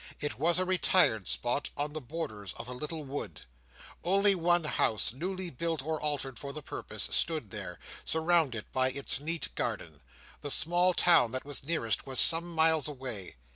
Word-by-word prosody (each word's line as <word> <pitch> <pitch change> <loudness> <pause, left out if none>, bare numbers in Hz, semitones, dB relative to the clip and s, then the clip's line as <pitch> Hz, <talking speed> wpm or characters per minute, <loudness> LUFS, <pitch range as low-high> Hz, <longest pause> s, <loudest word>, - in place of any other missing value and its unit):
It 145 -3 -4
was 170 +3 +2
a 185 - +1
retired 180 - +2
spot, 120 +4 -2
on 145 +1 -1
the 155 - -5
borders 115 - -6
of 120 - -8
a 125 - -6
little 150 +4 -6
wood. 140 +1 -6 0.6
Only 200 +3 +4
one 175 -1 +1
house, 115 -7 +1
newly 185 +5 -3
built 160 +1 -2
or 160 -1 -3
altered 140 -4 -3
for 140 - -6
the 155 - -7
purpose, - - -4
stood 155 - +1
there, - - -7 0.3
surrounded 160 -8 +1
by 130 0 +2
its 135 -1 +1
neat 160 +2 -2
garden; 80 -4 -4 0.4
the 145 - -4
small 175 +4 +3
town 170 -9 +5
that 130 - -3
was 145 -2 +1
nearest, 135 -9 -1
was 130 -2 +1
some 170 +1 +6
miles 160 -2 +2
away. 125 -9 -7
150 Hz, 175 wpm, -30 LUFS, 130-170 Hz, 0.6 s, some